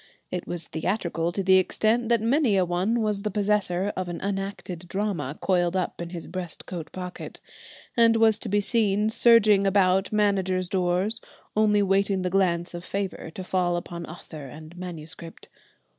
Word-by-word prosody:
It 180 Hz, -1 st, -4 dB
was 170 Hz, -1 st, -4 dB
theatrical 170 Hz, -1 st, -1 dB
to 195 Hz, +3 st, -2 dB
the 190 Hz, 0 st, +6 dB
extent 220 Hz, +5 st, +1 dB
that 235 Hz, -2 st, +3 dB
many 240 Hz, -3 st, +3 dB
a 185 Hz, -, +3 dB
one 185 Hz, +7 st, 0 dB
was 210 Hz, -2 st, 0 dB
the 210 Hz, -, -2 dB
possessor 205 Hz, -2 st, 0 dB
of 185 Hz, -1 st, -3 dB
an 175 Hz, -, -5 dB
unacted 195 Hz, -3 st, -4 dB
drama 190 Hz, -7 st, -2 dB
coiled 175 Hz, -1 st, +1 dB
up 185 Hz, -2 st, -2 dB
in 170 Hz, -, -5 dB
his 170 Hz, -1 st, -7 dB
breast 180 Hz, -2 st, -6 dB
coat 170 Hz, -4 st, -7 dB
pocket, 180 Hz, -1 st, -7 dB, 0.6 s
and 230 Hz, -1 st, +5 dB
was 225 Hz, -1 st, +4 dB
to -, -, -5 dB
be 205 Hz, +1 st, +2 dB
seen 210 Hz, -1 st, +2 dB
surging 215 Hz, -4 st, +5 dB
about 190 Hz, 0 st, +3 dB
managers' 190 Hz, -3 st, +1 dB
doors, 185 Hz, +4 st, +1 dB, 0.3 s
only 210 Hz, -1 st, +3 dB
waiting 195 Hz, 0 st, +2 dB
the 180 Hz, -, -1 dB
glance 175 Hz, -3 st, +1 dB
of 175 Hz, 0 st, -6 dB
favour 195 Hz, -3 st, -4 dB
to 185 Hz, -, -5 dB
fall 180 Hz, -1 st, 0 dB
upon 170 Hz, -1 st, -6 dB
author 155 Hz, -3 st, -9 dB
and 155 Hz, +5 st, -11 dB
manuscript. 170 Hz, -2 st, -8 dB
190 Hz, 170 wpm, -26 LUFS, 175-205 Hz, 0.6 s, the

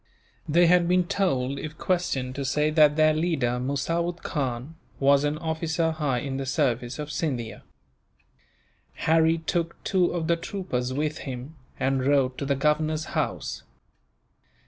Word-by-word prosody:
They 170 Hz, +4 st, +5 dB
had 175 Hz, 0 st, +4 dB
been 180 Hz, +1 st, +3 dB
told, 140 Hz, -8 st, 0 dB
if 155 Hz, +1 st, -7 dB
questioned, 140 Hz, -8 st, -1 dB
to 140 Hz, -, -4 dB
say 150 Hz, +3 st, +1 dB
that 150 Hz, -2 st, +5 dB
their 155 Hz, 0 st, +4 dB
leader, 155 Hz, -7 st, 0 dB
Musawood 165 Hz, +6 st, -2 dB
Khan, 130 Hz, 0 st, -3 dB, 0.3 s
was 140 Hz, +1 st, +4 dB
an 150 Hz, +1 st, 0 dB
officer 160 Hz, 0 st, -1 dB
high 150 Hz, -5 st, -1 dB
in 135 Hz, 0 st, -3 dB
the 135 Hz, -, -3 dB
service 125 Hz, -4 st, 0 dB
of 150 Hz, -1 st, -5 dB
Scindia. 130 Hz, -7 st, -3 dB, 1.4 s
Harry 160 Hz, +1 st, +4 dB
took 170 Hz, +1 st, -2 dB
two 185 Hz, -2 st, +2 dB
of 170 Hz, -2 st, -2 dB
the 170 Hz, +1 st, +2 dB
troopers 165 Hz, -9 st, -3 dB
with 150 Hz, +3 st, -2 dB
him, 130 Hz, +3 st, -7 dB, 0.2 s
and 135 Hz, 0 st, +1 dB
rode 135 Hz, -2 st, +2 dB
to 140 Hz, -, -3 dB
the 140 Hz, -, +2 dB
governor's 155 Hz, +2 st, +1 dB
house. -, -, -2 dB
150 Hz, 145 wpm, -26 LUFS, 135-165 Hz, 1.4 s, They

